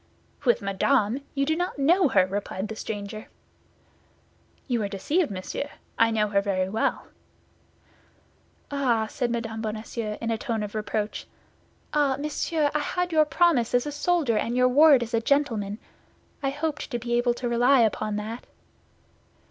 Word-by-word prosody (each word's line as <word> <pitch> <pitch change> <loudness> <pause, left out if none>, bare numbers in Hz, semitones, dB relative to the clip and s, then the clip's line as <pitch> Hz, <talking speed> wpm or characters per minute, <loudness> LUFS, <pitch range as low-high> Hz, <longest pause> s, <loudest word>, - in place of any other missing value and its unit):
"With 240 -3 +3
Madame! 210 +5 +1
You 275 0 +1
do 315 +2 +1
not 355 -1 -2
know 335 +6 +4
her," 190 -8 +4
replied 195 +1 -4
the 220 - -5
stranger. 215 0 -6 1.4
"You 240 -4 0
are 205 - -1
deceived, 290 - 0
monsieur; 195 +8 -5 0.3
I 230 0 +4
know 215 -2 +1
her 200 -1 +2
very 190 -2 0
well." 220 +3 -1 1.7
"Ah," 250 -6 +1
said 245 +2 -2
Mme. 225 -1 -3
Bonacieux; 215 0 -4
in 230 0 -2
a 225 - -1
tone 230 -5 -2
of 205 - -6
reproach, 215 0 -3 0.7
"ah, 285 -3 +2
monsieur, 300 +1 -1
I 300 - +1
had 355 +4 -2
your 310 -1 +4
promise 300 -8 +2
as 245 - +2
a 295 - -3
soldier 290 -6 +1
and 235 +3 -2
your 250 0 +4
word 285 -1 +6
as 235 +1 -8
a 230 - +2
gentleman. 225 -7 0 0.6
I 275 - 0
hoped 295 +2 -3
to 245 - -2
be 240 0 -4
able 240 0 +2
to 245 - -3
rely 245 +2 +4
upon 215 -1 0
that." 220 +3 -5
240 Hz, 160 wpm, -26 LUFS, 215-285 Hz, 1.7 s, word